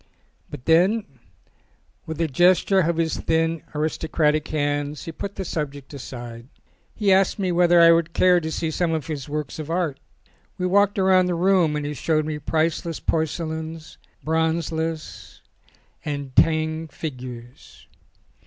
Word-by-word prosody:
But 140 -4 -9
then, 185 +7 +3 1.0
with 160 0 -5
a 165 - +2
gesture 180 +6 +3
of 170 -2 +1
his 165 -1 0
thin, 165 0 0
aristo 155 +1 -2
cratic 155 -1 +1
hands, 145 -1 -2
he 165 - -5
put 200 +5 -6
the 190 - -4
subject 145 -4 -5
aside. 120 -3 -8 0.5
He 205 -3 +3
asked 190 0 +3
me 190 -3 -1
whether 175 0 +4
I 170 0 +8
would 165 0 +2
care 180 +1 +4
to 160 -1 -4
see 160 0 -2
some 165 +1 0
of 155 -3 -2
his 150 -3 -5
works 150 0 -4
of 155 0 -6
art. 165 -5 -1 0.6
We 180 - -2
walked 200 +2 +3
round 185 -1 +4
the 175 - 0
room 175 -3 +3
and 150 -1 -2
he 145 - -3
showed 155 +2 0
me 155 -1 -3
priceless 160 +2 -1
porcelains, 160 0 -3 0.2
bronzes, 160 0 -2 0.6
and 140 -3 -5
Tang 160 0 +2
figures. 125 -5 -9
160 Hz, 150 wpm, -23 LUFS, 150-170 Hz, 1.0 s, I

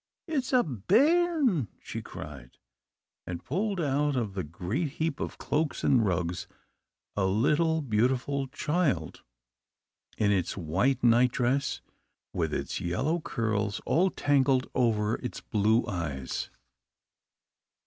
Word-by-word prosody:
"It's 290 -6 -1
a 250 -2 +5
bairn!" 245 - +2
she - - -6
cried, 70 -5 -10 0.7
and 85 -2 -6
pulled 195 +6 -1
out 145 -1 +1
of 115 -6 -1
the 95 -1 -3
great 95 - -3
heap 160 -2 -2
of - - -4
cloaks 150 0 -1
and 125 -4 +4
rugs 90 -3 -1 0.7
a 95 -2 +1
little 150 - +2
beautiful 130 +4 +1
child, 140 - -1 1.0
in 105 -1 +2
its 95 -2 0
white 115 - 0
nightdress, 125 +3 +2 0.5
with - - -1
its - - -3
yellow 135 - 0
curls 110 -9 -1
all 185 +4 +3
tangled 135 -5 +2
over 110 -3 +1
its 125 - -6
blue 110 +3 +2
eyes. 75 -8 -3
125 Hz, 115 wpm, -28 LUFS, 100-155 Hz, 1.0 s, a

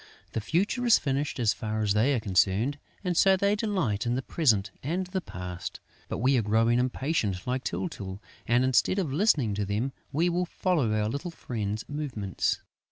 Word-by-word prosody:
The 115 - -2
future 190 - 0
is 235 -2 +6
finished, 140 0 -2
as 115 -3 +3
far 110 -1 -3
as 100 -1 +2
they 120 +7 +3
are - - +1
concerned; 100 +7 +1 0.2
and 180 -2 0
so 190 +2 +5
they 200 +2 +2
delight 180 - -1
in 120 - +1
the 130 - -2
present 110 - +2
and 175 +7 -1
the 185 +1 -3
past. 90 - -6 0.3
But - - -2
we 130 +3 +3
are - - +2
growing 115 +3 +3
impatient, 125 - -1
like 125 +1 -1
Tyltyl; 100 - -4 0.3
and, 120 +2 +3
instead 130 +8 +3
of 165 -9 -1
listening 145 - +3
to 105 +1 -1
them, 110 +7 -1 0.2
we 160 +5 +2
will 175 +1 0
follow 165 - +1
our 105 0 +1
little 140 +9 -3
friend's 110 -9 -4
movements. 130 -10 -2
130 Hz, 185 wpm, -28 LUFS, 105-165 Hz, 0.3 s, is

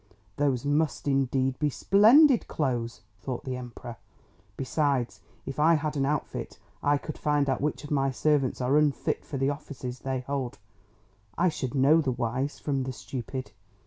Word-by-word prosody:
"Those 140 -3 +1
must 150 +1 0
indeed 135 -1 +1
be 150 - +2
splendid 230 - +5
clothes," 120 - -2 0.2
thought 125 +6 -4
the 130 -1 -3
Emperor. 120 -2 -8 0.6
"Besides, 135 -2 0 0.3
if 135 +1 -5
I 165 +2 +5
had 155 0 -2
an 135 -1 +1
outfit, 150 0 -3 0.2
I 145 0 +3
could 155 +2 -7
find 145 -1 +1
out 135 - 0
which 150 +2 -2
of 145 - -9
my 135 -2 +2
servants 135 -1 +1
are 135 +4 +3
unfit 150 -2 0
for 145 - -5
the 135 +2 +1
offices 130 -4 -7
they 130 -1 -3
hold; 130 -3 -3 0.8
I 180 +2 +3
should 135 -4 -4
know 140 +5 +5
the 135 -4 0
wise 125 +4 -2
from 140 -3 -2
the 130 0 -3
stupid! 130 +1 -6
135 Hz, 165 wpm, -27 LUFS, 130-150 Hz, 0.8 s, splendid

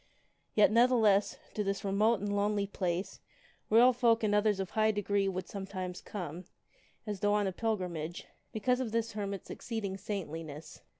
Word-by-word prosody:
Yet, 210 -1 +6
ne'theless, 225 -4 +4 0.2
to 210 - -1
this 195 +1 -2
remote 210 +3 +2
and 205 0 -1
lonely 205 0 +1
place 185 -2 -3 0.5
royal 240 +4 +6
folk 230 -2 +3
and 210 -1 +2
others 210 -1 +3
of 195 +1 -3
high 215 0 +3
degree 205 -1 +1
would 185 -1 -3
sometimes 190 -2 -5
come, 175 -3 -6 0.6
as 210 -3 -4
though 205 +1 +2
on 205 -1 +2
a 190 - 0
pil 220 +3 0
grimage, 170 -3 -5 0.3
because 250 +3 +1
of 250 -4 -2
the 230 0 +2
hermit's 200 -2 -4
exceeding 210 -5 -4
saintliness. 165 -6 -6
205 Hz, 165 wpm, -32 LUFS, 190-220 Hz, 0.6 s, Yet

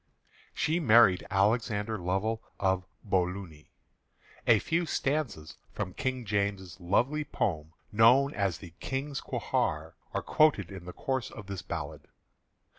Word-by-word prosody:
She 160 +3 +1
married 115 - +5
Alexander 105 +1 +1
Lovell 95 +5 -1 0.2
of 95 -1 +1 0.2
Bolunnie. 90 -5 -2 0.8
A 115 - +7
few 165 - 0
stanzas 135 - -2 0.2
from 90 - -4
King 130 -3 -2
James's 100 -4 -2
lovely 125 +12 +1
poem, 80 - -2 0.2
known 125 +6 +5
as 100 -4 0
The 85 -5 -12
King's 135 +1 -3
Quhair, - - -1 0.2
are - - -2
quoted 145 - +3
in 95 -3 -8
the 90 - -6
course 130 -2 -2
of 105 - -10
this 100 -1 -5
ballad. 75 -5 -6
105 Hz, 125 wpm, -30 LUFS, 90-130 Hz, 0.8 s, A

